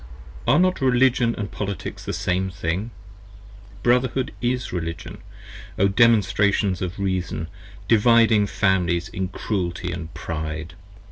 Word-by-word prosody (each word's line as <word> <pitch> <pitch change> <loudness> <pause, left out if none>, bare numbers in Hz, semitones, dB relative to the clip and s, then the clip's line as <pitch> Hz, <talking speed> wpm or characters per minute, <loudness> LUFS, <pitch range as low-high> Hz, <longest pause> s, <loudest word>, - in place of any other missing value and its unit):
10 120 - +5
Are - - +4
not 185 -3 +2
Religion 125 -2 +3
& - - -18
Politics 100 -4 -5
the - - -4
Same 95 0 -1
Thing? 90 +5 -3 0.9
Brotherhood 125 +1 +1
is 125 -2 -1
Religion, 85 -1 -5 0.6
O 100 - +4
Demonstrations 100 -3 +3
of 90 -1 -3
Reason, 95 -4 -2 0.4
Dividing 115 -2 +5
Families 90 -4 +1
in 95 0 -3
Cruelty 90 -2 -3 0.2
& - - -18
Pride! 80 0 -5
100 Hz, 120 wpm, -23 LUFS, 90-115 Hz, 0.9 s, 10